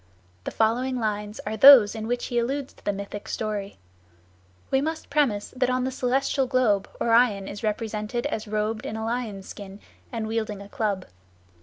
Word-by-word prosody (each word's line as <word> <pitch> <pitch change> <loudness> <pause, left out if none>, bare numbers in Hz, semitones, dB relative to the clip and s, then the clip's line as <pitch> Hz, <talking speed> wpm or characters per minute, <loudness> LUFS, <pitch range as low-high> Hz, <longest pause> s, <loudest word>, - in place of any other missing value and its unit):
The - - -1
following 245 +3 +1
lines 210 -1 -3
are 215 +1 -2
those 240 -3 +9
in 220 -1 -5
which 245 +1 -1
he 240 - 0
alludes 270 +3 -2
to - - -23
the - - +1
mythic 200 +1 -7
story. 205 -2 -4 0.9
We 265 - +3
must 315 +1 -4
premise 265 -9 +1
that 255 0 +1
on 255 0 +1
the 260 - -1
celestial 265 +1 0
globe 245 -6 +2
Orion 230 -4 +3
is 205 - -7
represented 215 +2 -2
as 220 0 -3
robed 215 +1 -2
in 220 - -4
a 220 0 -3
lion's 225 -5 -3
skin 200 -1 -9 0.3
and 230 -3 -3
wielding 220 -2 -2
a 200 - -10
club. 210 -7 -2
220 Hz, 175 wpm, -25 LUFS, 210-250 Hz, 0.9 s, those